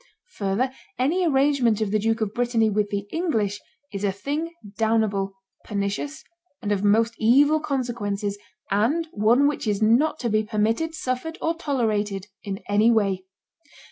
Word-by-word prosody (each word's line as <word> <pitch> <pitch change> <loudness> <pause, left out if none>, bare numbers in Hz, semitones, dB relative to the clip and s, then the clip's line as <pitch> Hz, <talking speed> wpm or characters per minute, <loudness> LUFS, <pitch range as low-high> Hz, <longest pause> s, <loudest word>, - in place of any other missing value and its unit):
Further, 205 +6 0 0.3
any 330 +9 +2
arrangement 270 -6 +3
of 215 -3 -1
the 215 - +2
Duke 225 +2 0
of 215 -1 -1
Brittany 235 -2 +1
with 205 0 0
the 200 -1 -3
English 220 - 0 0.3
is 200 0 -4
a 200 - +2
thing 290 - -3 0.2
damnable, 215 -3 +1 0.3
pernicious, 205 +9 -3 0.4
and 205 - -3
of 200 -1 0
most 225 +3 +3
evil 285 +7 +5
consequences, 230 -8 -2 0.3
and 255 +12 +1
one 235 +7 +4
which 290 -5 -2
is 205 -2 +1
not 245 +9 +3
to 240 - 0
be 215 0 +2
permitted, 225 +10 0
suffered, 265 +4 -3
or 325 - 0
tolerated 215 - -1 0.2
in 195 -1 -5
any 210 +3 +4
way. 195 -5 +1
225 Hz, 150 wpm, -24 LUFS, 205-275 Hz, 0.4 s, evil